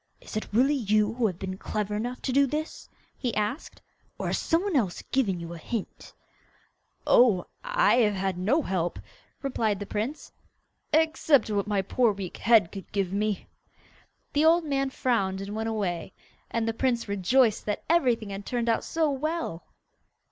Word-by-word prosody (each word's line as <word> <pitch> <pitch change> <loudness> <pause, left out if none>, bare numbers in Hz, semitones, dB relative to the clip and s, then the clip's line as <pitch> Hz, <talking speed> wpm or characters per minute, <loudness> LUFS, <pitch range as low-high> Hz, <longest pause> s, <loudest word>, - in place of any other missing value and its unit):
'Is - - -10
it 215 - -2
really 255 +7 +4
you 215 -4 +2
who 235 -1 +1
have 180 -4 -4
been 190 0 -5
clever 210 -1 -3
enough 245 +4 -4
to 260 - -1
do 275 +2 +4
that?' 305 +3 -4 0.3
he 245 -4 -3
asked. 215 +8 -3 0.3
'Or - - -4
has - - 0
some 330 +2 +1
one 400 -5 -1
else 205 -10 0
given 205 -10 +1
you 170 0 -7
a 170 - -8
hint?' 220 +4 -6 0.9
'Oh, 215 -8 +5 0.2
I - - +3
have 210 -4 +3
had 190 -1 -1
no 225 - +1
help,' 175 -2 -1 0.5
replied 220 -7 0
the 205 - -4
prince, 225 +10 -4 0.6
'except 315 -5 +3
what 205 -1 0
my 205 -2 +1
poor 230 +3 +2
weak 195 -3 -6
head 225 -7 +4
could 195 -3 -9
give 195 -2 -1
me.' 210 0 -1 0.9
The 290 - +3
old 330 +2 +5
man 275 -2 0
frowned, 210 -8 0
and 200 +2 -5
went 220 +1 -2
away, 190 -6 -3 0.4
and 230 -1 -1
the 225 - 0
prince 240 -1 0
rejoiced 210 +5 +2
that 210 - -2
everything 245 -11 +2
had 195 +1 -5
turned 240 +1 -1
out 225 - +1
so 320 -2 0
well. 300 - -3
225 Hz, 175 wpm, -27 LUFS, 200-270 Hz, 0.9 s, Oh